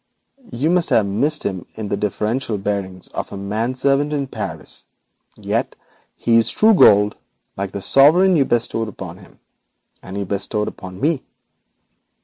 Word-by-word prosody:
You 150 +7 0
must 180 -1 +2
have 110 - +3
missed 145 +10 0
in 95 -3 -3
him 110 -2 -6
the - - 0
deferential 105 +3 -2
bearing 95 -2 -3
of - - -4
a 100 - -6
man 110 +6 -2
servant 140 +3 +1
in 140 -2 -1
Paris, 135 - -4 0.5
yet - - -2 0.4
he 115 -1 +3
is 115 - +3
true 220 +1 +5
gold, 105 - +5 0.4
like 100 0 -4
the 100 - -6
sovereign 170 - +5
you 145 - +4
bestowed 115 -2 0
upon 95 -3 -8
him, 90 - -18 0.6
and 95 +2 -8
he 100 - -1
bestowed 105 +2 -2
upon 95 -1 -8
me. 150 0 +1
110 Hz, 155 wpm, -20 LUFS, 100-140 Hz, 0.6 s, true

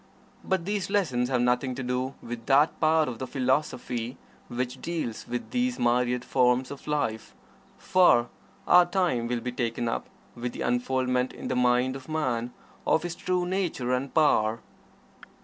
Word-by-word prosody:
But 190 -3 -1
these 205 -1 -2
lessons 130 -12 +1
have 125 -2 +1
nothing 125 +1 +1
to 130 - -4
do 125 +2 -2
with 115 -1 -7
that 145 +3 +4
part 160 0 +3
of 120 -3 -5
the 130 - -4
philosophy 125 -3 -1 0.3
which 125 +1 -4
deals 160 -10 -4
with 120 0 -4
these 250 0 0
myriad 125 +1 +1
forms 125 0 +2
of 140 - -9
life, 145 -8 -2 0.4
for 175 -11 +4 0.4
our 175 0 +7
time 175 -11 0
will 120 0 -2
be 125 - -3
taken 120 -1 -2
up 115 - -2 0.3
with 120 0 -5
the - - -6
unfoldment 125 +1 0
in - - -6
the 130 - 0
mind 125 +1 +2
of 135 +2 -10
man 125 -6 -1 0.4
of 160 - +3
his 175 -1 -3
true 180 +1 -1
nature 175 -9 -1
and 130 +2 -1
power. 115 -8 +3
125 Hz, 165 wpm, -27 LUFS, 120-155 Hz, 0.4 s, our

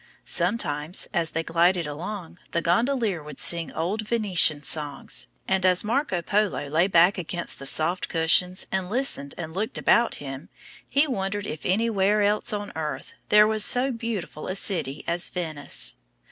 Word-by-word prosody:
Sometimes, 170 -4 0
as 170 -3 0
they 165 +1 -3
glided 170 +1 +2
along, 170 +4 -7
the 170 - +1
gondolier 225 - +1
would 150 -1 -10
sing 170 -1 0
old 185 +7 -2
Venetian 185 -10 +3
songs; 145 -2 -2 0.2
and 190 -1 +1
as 185 -1 +3
Marco 215 - -1
Polo 205 -6 0
lay 165 +5 +2
back 180 +1 +4
against 175 0 -4
the 135 - -6
soft 165 +6 +1
cushions 175 +3 +2
and 190 -1 -2
listened 225 - -1
and 160 -2 -6
looked 210 +5 -3
about 235 0 +3
him, 135 0 -8 0.4
he 280 +2 +3
wondered 205 -6 -3
if 155 -6 -5
anywhere 205 0 +2
else 210 +3 +1
on 205 -1 -4
earth 150 -4 -5 0.2
there 210 0 +7
was 215 -1 +4
so 255 +4 +5
beautiful 230 -10 -5
a 185 - -3
city 155 -8 0
as 175 +1 0
Venice. 155 - -2
180 Hz, 160 wpm, -25 LUFS, 160-210 Hz, 0.4 s, there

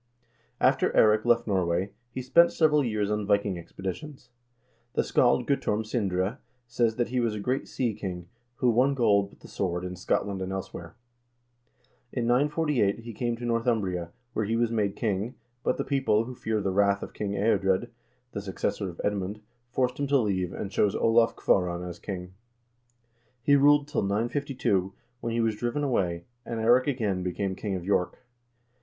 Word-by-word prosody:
After - - +3
Eirik 110 +1 +5
left 120 0 +3
Norway, 95 -1 0 0.2
he 130 +1 -5
spent 170 +7 +5
several 150 -2 +3
years 105 -4 -1
on 105 -1 -1
Viking 100 -1 +2
expedi 90 +2 -5
tions. 145 - -12 0.6
The - - +2
scald 120 0 +3
Guttorm 110 -6 0
Sindre 100 -1 -1 0.3
says 120 -1 +1
that 120 -1 -1
he 125 +1 0
was 115 -3 0
a - - -4
great 125 +6 -1
sea 120 -4 -1
king, 90 -4 -6 0.3
who 125 0 +2
won 130 +4 +3
gold 100 -5 +3
with - - -21
the - - -12
sword 90 -2 -2
in 90 0 -5
Scotland 95 +1 -1
and 95 0 -3
elsewhere. 90 -2 -6 1.2
In 120 -3 -2
948 140 -3 +2
he 115 0 -8
came 120 +2 -1
to 120 - -6
Northumbria,1 110 -7 0 0.2
where 110 - 0
he 110 +3 0
was 115 0 +1
made 105 -3 0
king, 110 +1 -2 0.3
but - - +1
the - - -1
people, 135 -6 +2
who 125 +2 -7
feared 110 -3 -2
the 95 - 0
wrath 100 +1 +2
of - - -8
King 100 -1 -3
Eadred, 100 +1 +1 0.4
the 100 - -4
successor 95 0 -2
of 85 - -11
Edmund, 105 0 -2 0.3
forced 125 +1 0
him 140 - 0
to 140 0 +4
leave, 95 -7 0
and 100 - -5
chose 105 -1 +2
Olav 115 0 +3
Kvaaran 90 -1 0
king. 90 -2 -6 1.1
He 145 - +5
ruled 145 +1 +5
till 150 - -1
952, 105 -2 0 0.3
when 115 -2 -3
he 115 - +1
was 110 -2 +1
driven 120 +6 -1
away, 90 -11 0 0.2
and 115 -2 -4
Eirik 120 +4 +4
again 110 -9 0
became 95 +2 -2
king 100 0 -3
of 90 -2 -5
York. 100 +4 0
110 Hz, 175 wpm, -27 LUFS, 95-120 Hz, 1.2 s, Eirik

